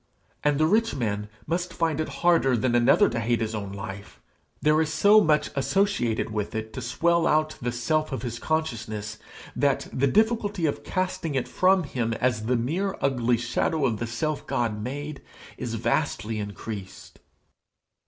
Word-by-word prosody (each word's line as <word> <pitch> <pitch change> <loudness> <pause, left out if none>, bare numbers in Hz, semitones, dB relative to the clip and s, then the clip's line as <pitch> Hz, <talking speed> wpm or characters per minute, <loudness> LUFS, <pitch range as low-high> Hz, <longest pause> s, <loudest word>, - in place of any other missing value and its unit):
And 145 -1 +2
the 155 - +4
rich 225 +6 +2
man 105 -4 -2 0.2
must 175 +2 -2
find 160 -3 0
it 155 - -1 0.2
harder 150 -8 +4
than 120 +2 +1
another 120 0 +5
to 120 - -2
hate 115 +1 +1
his 110 -1 -2
own 100 -3 -4
life. 100 0 -8 0.4
There 155 +1 +3
is 155 -1 -1
so 205 +6 +6
much 150 -1 +2
associated 140 - +1
with 105 +1 -3
it 110 0 -4
to 130 - -5
swell 165 +7 +2
out 155 0 +2
the 120 0 -1
self 155 +7 0
of 130 - -4
his 120 -2 -4
consciousness, 115 -9 -3 0.4
that 140 -2 +1
the 140 +2 +2
difficulty 210 - +1
of 145 - -1
casting 185 -5 -2
it 130 - 0
from 185 0 +3
him 120 -5 -2
as 115 -2 0
the 125 0 +2
mere 175 +12 -1
ugly 125 -3 +1
shadow 135 +5 0
of 115 -5 0
the 115 - -2
self 145 +6 -3
God 110 -3 -1
made, 145 +5 -5 0.3
is 115 -1 -4
vastly 115 -2 -1
increased. 100 -1 -7
130 Hz, 170 wpm, -26 LUFS, 115-160 Hz, 0.4 s, so